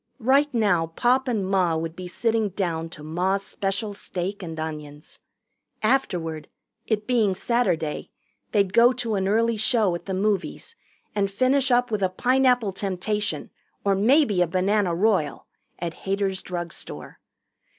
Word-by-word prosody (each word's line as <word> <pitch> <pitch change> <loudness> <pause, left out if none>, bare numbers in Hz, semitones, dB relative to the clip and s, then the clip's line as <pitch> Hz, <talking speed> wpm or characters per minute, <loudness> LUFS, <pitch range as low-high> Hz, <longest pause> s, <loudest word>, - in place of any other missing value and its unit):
Right 275 +4 +3
now 200 -9 +2
Pop 250 +10 +1
and 220 -6 0
Ma 185 -4 +2
would 160 0 -4
be 185 0 -7
sitting 225 +2 0
down 170 -4 -2
to 155 -2 -11
Ma's 185 +5 0
special 200 +2 -2
steak 195 0 -4
and 165 -3 -6
onions. 150 -2 -7 0.6
Afterward, 175 - 0 0.4
it 215 -2 0
being 220 -6 +2
Saturday, 180 -9 0 0.4
they'd 200 -3 +2
go 240 +3 +6
to 245 -3 -3
an 190 -2 0
early 230 +2 +2
show 220 -3 +2
at 170 - -6
the 190 - -2
movies 205 - -2 0.4
and 200 -1 +1
finish 260 +6 +2
up 245 -1 +2
with 210 -2 -1
a 190 - +2
Pineapple 250 +1 +2
Temptation 200 +2 -2 0.3
or 200 - +4
maybe 215 - +3
a 175 - +3
Banana 185 +1 +1
Royal 190 -5 +1 0.3
at 170 -1 -4
Hader's 195 0 -2
drugstore. 175 -2 -6
200 Hz, 145 wpm, -24 LUFS, 180-230 Hz, 0.6 s, go